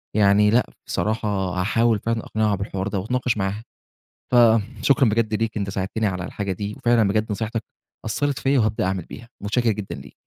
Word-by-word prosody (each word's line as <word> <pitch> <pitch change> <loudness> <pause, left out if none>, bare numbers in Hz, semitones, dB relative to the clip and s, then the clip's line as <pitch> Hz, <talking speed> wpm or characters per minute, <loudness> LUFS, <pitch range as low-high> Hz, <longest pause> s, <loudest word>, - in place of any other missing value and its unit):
يعني 105 0 +5
لأ 120 +3 +2 0.2
بصراحة 110 +1 -1 0.2
هاحاول 105 +5 +1
فعلًا 115 +2 -1
أقنعها 110 -1 +1
بالحوار 100 0 -3
ده 100 -1 -2
وأتناقش 125 +2 -1
معاها. 100 +2 -2 0.7
فشكرًا 120 +2 +4
بجد 110 0 +1
ليك 115 +1 -1
أنت 100 -2 -2
ساعدتِني 95 +3 -2
على 90 -3 -2
الحاجة 100 0 -3
دي، 100 +3 -4
وفعلًا 120 -4 +3
بجد 110 +1 0
نصيحتك 110 +1 -3 0.4
أثّرِت 140 +5 -1
فيَّ 135 0 +2
وهابدأ 110 -3 +1
أعمل 95 -2 -1
بيها، 115 - -11
متشكر 115 +3 +1
جدًا 105 -2 -5
ليك. - - -12
110 Hz, 170 wpm, -23 LUFS, 100-115 Hz, 0.7 s, يعني